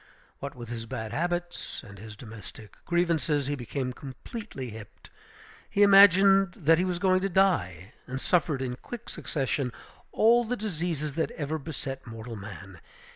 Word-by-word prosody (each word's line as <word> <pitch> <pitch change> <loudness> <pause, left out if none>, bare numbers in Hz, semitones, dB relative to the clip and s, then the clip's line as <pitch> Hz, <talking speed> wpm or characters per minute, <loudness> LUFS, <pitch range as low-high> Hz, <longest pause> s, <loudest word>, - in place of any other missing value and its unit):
What 140 0 -6
with 120 -2 -9
his 115 -1 -5
bad 110 0 -5
habits 175 +2 -2
and 100 -4 -12
his 110 +1 -9
domestic 110 -1 -11
grievances, 165 -4 +1
he 145 - -1
became 130 0 -3
completely 135 - -7
hipped. 110 -1 -12 0.6
He 205 - +4
imagined 195 -1 +7
that 165 +1 +4
he 180 - +2
was 180 -1 -1
going 185 0 +3
to 195 - 0
die; 105 - +1
and 130 +1 -4
suffered 150 -4 +1
in 125 -1 -3
quick 240 - -8
succession 135 -2 -2 0.4
all 235 +2 +5
the 245 +2 -2
diseases 165 -7 -2
that - - 0
ever 155 +1 -3
beset 135 -3 -5
mortal 115 0 -7
man. 100 -2 -10
145 Hz, 155 wpm, -28 LUFS, 120-180 Hz, 0.6 s, imagined